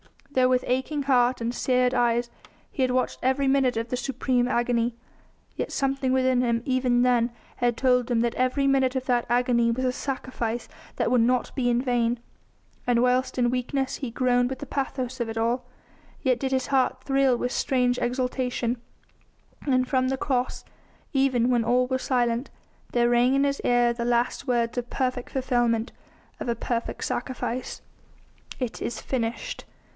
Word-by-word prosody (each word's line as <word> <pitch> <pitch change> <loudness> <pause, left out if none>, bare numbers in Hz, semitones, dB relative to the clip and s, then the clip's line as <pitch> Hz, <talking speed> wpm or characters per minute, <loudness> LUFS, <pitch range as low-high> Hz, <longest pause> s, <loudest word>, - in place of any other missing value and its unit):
Though 255 -2 +3
with 255 0 +2
aching 265 +3 -1
heart 255 -2 +3
and 230 +1 -1
seared 250 0 +1
eyes 240 0 +1 0.4
he 275 - -4
had 255 - +3
watched 255 0 0
every 265 +2 +1
minute 265 -3 +2
of 230 +1 -2
the 250 - -1
supreme 250 -1 0
agony, 240 -1 0 0.6
yet - - -3
something 270 -1 0
within 260 -1 +3
him, 235 -1 0
even 255 -2 +2
then, 245 -1 +3 0.3
had 240 -1 +1
told 250 -2 +2
him 235 -2 +2
that 235 0 0
every 255 +2 +1
minute 270 -1 +2
of 260 -1 -2
that 245 -2 +1
agony 240 -1 +2
was 255 +3 -1
a 255 - +2
sacrifice 250 -3 -4 0.3
that - - 0
would 250 -2 +4
not 245 +1 +1
be 245 -3 0
in 240 0 +2
vain. 240 -2 +1 0.7
And 240 -1 +3
whilst 250 +1 +1
in 240 -1 +2
weakness 255 +2 -1
he 265 - -4
groaned 245 +1 +2
with 265 - -5
the - - -6
pathos 260 -2 -3
of 235 -1 -2
it 225 - -5
all, 235 +2 0 0.6
yet 255 -3 +2
did 265 -1 -1
his 260 -1 0
heart 260 -1 +1
thrill 270 -2 +3
with 245 - -2
strange 250 -2 +1
exultation, 250 -1 -1 0.9
and 255 -2 +2
from 255 -1 +1
that 265 0 -2
Cross 255 -3 -1 0.5
even 260 -3 +2
when 240 -2 +2
all 250 +1 +3
was 260 0 -1
silent 240 0 0 0.4
there 240 0 +3
rang 245 +2 +4
in 275 - +3
his 280 0 0
ear 245 -1 +3
the 235 0 -3
last 240 +3 0
words 235 -1 0
of 245 0 -7
perfect 255 -2 -2
fulfilment 240 -3 0 0.5
of - - -4
a 235 - +1
perfect 230 0 -3
sacrifice: 255 -1 -3 0.8
"It 250 -3 -4
is 225 - -3
finished!" 260 - -3
250 Hz, 175 wpm, -26 LUFS, 240-260 Hz, 0.9 s, would